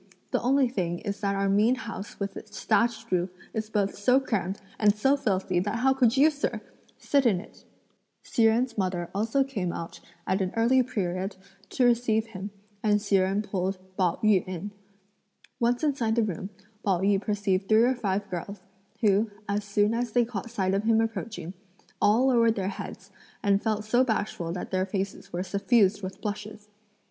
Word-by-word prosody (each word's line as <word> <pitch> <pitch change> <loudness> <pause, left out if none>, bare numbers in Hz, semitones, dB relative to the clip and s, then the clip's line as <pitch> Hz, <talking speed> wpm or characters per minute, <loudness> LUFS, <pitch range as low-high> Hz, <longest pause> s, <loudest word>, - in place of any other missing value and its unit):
The - - +1
only 265 +2 +3
thing 175 -7 -2
is 200 +1 -5
that 200 -2 0
our 195 0 +1
mean 210 +5 +4
house 230 -5 -7
with 200 -1 -3
its 210 -1 -9
thatched 230 +1 +1
roof 180 0 +1 0.2
is 220 -1 -3
both 205 -2 0
so 250 +6 +4
crammed 205 -7 -2 0.2
and 210 -1 +4
so 270 +7 +3
filthy 190 -8 0
that 205 +4 -1
how 260 +3 +3
could 255 -2 +3
you, 300 +4 +6
sir, 290 0 -2 0.4
sit 280 -1 +2
in 195 -6 +2
it!" 210 - -14 0.6
Hsi 230 - +1
Jen's 225 +1 +2
mother 180 -2 -2
also 225 +7 +1
came 205 -10 -3
out 165 - -7 0.3
at 190 +2 0
an 185 -1 -1
early 240 +3 +4
period 195 -6 -2 0.3
to 255 - +2
receive 235 -2 +2
him, 200 -3 -7 0.3
and 210 -1 +3
Hsi 205 -1 +2
Jen 195 +2 +1
pulled 195 -2 -2 0.2
Pao 185 -3 +2
yü 210 -4 +4
in. 185 +2 -5 0.9
Once 245 +3 +1
inside 260 -7 +1
the 230 - +3
room, 190 -2 -4 0.3
Pao 190 -3 +1
yü 195 0 +2
perceived 205 -2 -1
three 220 +1 +6
or 250 +2 +4
five 205 -4 -2
girls, 185 +2 -6 0.4
who, 210 0 +3 0.2
as 205 +1 -1
soon 205 +1 +1
as 235 -1 -2
they 245 -1 +4
caught 225 -1 -5
sight 195 -5 0
of 195 - +2
him 225 -1 +4
approaching, 225 -5 -3 0.5
all 225 +5 +4
lowered 230 -3 +4
their 195 -3 -1
heads, 195 0 -8 0.3
and 200 0 +3
felt 215 -1 -1
so 240 +4 +3
bashful 210 -8 -2
that 180 - -5
their 185 0 0
faces 195 0 -4
were 175 +1 -2
suffused 200 +1 +2
with 190 0 -7
blushes. 210 0 -6
210 Hz, 185 wpm, -27 LUFS, 195-230 Hz, 0.9 s, you